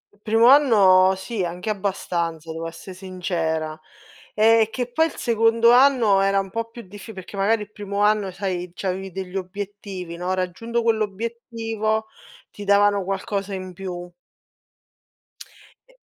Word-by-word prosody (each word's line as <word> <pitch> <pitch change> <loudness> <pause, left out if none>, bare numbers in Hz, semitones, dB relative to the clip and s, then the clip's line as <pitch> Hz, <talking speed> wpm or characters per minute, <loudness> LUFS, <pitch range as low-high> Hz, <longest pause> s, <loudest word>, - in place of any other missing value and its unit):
Il - - -32
primo 225 +2 +3
anno 200 -9 +6
sì, 195 0 -3
anche 180 +5 -3
abbastanza, 170 -5 -3
devo 165 +1 -5
esse 170 +3 -9
sincera. 170 -4 -3 0.6
Ehm, 220 +1 +5
che 245 +1 -4
poi 320 +6 +3
il 320 - -10
secondo 230 0 +3
anno 245 -6 +5
era 195 0 +2
un 195 -1 -4
po' 230 +1 -3
più 235 +1 -10
diffi 205 +4 -11
perché 190 +1 -10
magari 210 +3 +1
il 210 - -15
primo 200 -1 -4
anno 210 -2 +2
sai, 180 -2 -4
c'avevi 190 0 -3
degli 185 0 -7
obiettivi, 195 -2 -6
no, 180 +2 -3
raggiunto 230 +6 -2
quell'obiettivo 225 0 -2 0.5
ti 205 - -9
davano 200 0 +3
qualcosa 195 +1 -3
in 185 -1 -7
più. 175 -1 -7 1.8
E - - -22
200 Hz, 140 wpm, -23 LUFS, 185-225 Hz, 1.8 s, anno